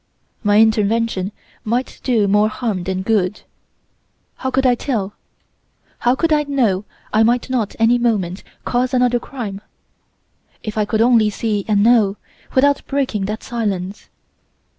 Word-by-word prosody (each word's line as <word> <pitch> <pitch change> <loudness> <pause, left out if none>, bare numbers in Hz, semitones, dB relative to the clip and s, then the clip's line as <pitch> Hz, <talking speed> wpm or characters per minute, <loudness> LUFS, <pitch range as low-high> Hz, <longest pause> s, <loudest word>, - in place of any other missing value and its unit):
My 205 -1 +3
intervention 220 -2 +2 0.3
might 240 +3 -2
do 225 -6 +2
more 210 +2 +3
harm 215 -6 -3
than 190 0 -2
good. 205 -2 0 1.0
How 260 - -2
could 265 +1 +1
I 250 - +5
tell? 220 -6 -2 0.9
How 245 +1 +2
could 325 +2 +1
I 300 - +3
know 240 -9 0 0.3
I 215 - +4
might 240 +3 +2
not 230 -6 -1
any 230 +2 +3
moment 200 -6 0 0.2
cause 250 +1 0
another 245 -1 +3
crime? 220 -6 -6 1.0
If 215 -2 -5
I 215 -1 +1
could 220 +1 0
only 230 -3 +4
see 210 -1 -2
and 205 -2 +3
know, 215 -4 +4 0.4
without 285 +2 +3
breaking 260 -8 -1
that 215 +3 -4
silence! 200 -5 -4
225 Hz, 140 wpm, -19 LUFS, 205-245 Hz, 1.0 s, I